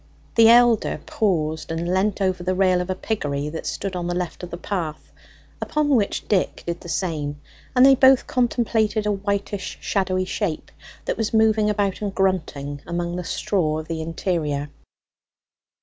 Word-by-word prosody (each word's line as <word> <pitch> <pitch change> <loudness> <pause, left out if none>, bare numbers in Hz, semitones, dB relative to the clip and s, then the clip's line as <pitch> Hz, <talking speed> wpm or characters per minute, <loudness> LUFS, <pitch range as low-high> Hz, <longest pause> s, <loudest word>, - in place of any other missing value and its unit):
The 225 -1 +7
elder 240 -2 +5
paused 160 -7 -1
and 165 +1 -2
leant 200 +2 +1
over 185 -2 0
the 185 +1 -1
rail 185 -1 +3
of 180 - -5
a 185 - 0
piggery 145 -9 -2
that 160 +1 -6
stood 195 -1 -3
on 175 -1 -3
the 175 - -1
left 180 -1 -4
of 180 - -7
the 170 - -6
path, 170 -5 -4 0.5
upon 300 -1 0
which 230 -8 +1
Dick 195 -4 0
did 170 0 -4
the 175 - -9
same; 155 -4 -2 0.4
and 250 +1 +7
they 270 - +8
both 265 0 +5
contemplated 225 -3 +1
a 210 - +2
whitish 200 0 -3
shadowy 185 -2 0
shape 185 -4 -3 0.3
that - - -2
was 225 0 -1
moving 220 -1 +4
about 205 -2 0
and 200 -2 -3
grunting 150 -7 -1
among 175 0 -2
the 180 - -3
straw 165 -2 0
of 155 0 -6
the 165 -1 -3
interior. 160 -3 -2
185 Hz, 170 wpm, -23 LUFS, 165-210 Hz, 0.5 s, they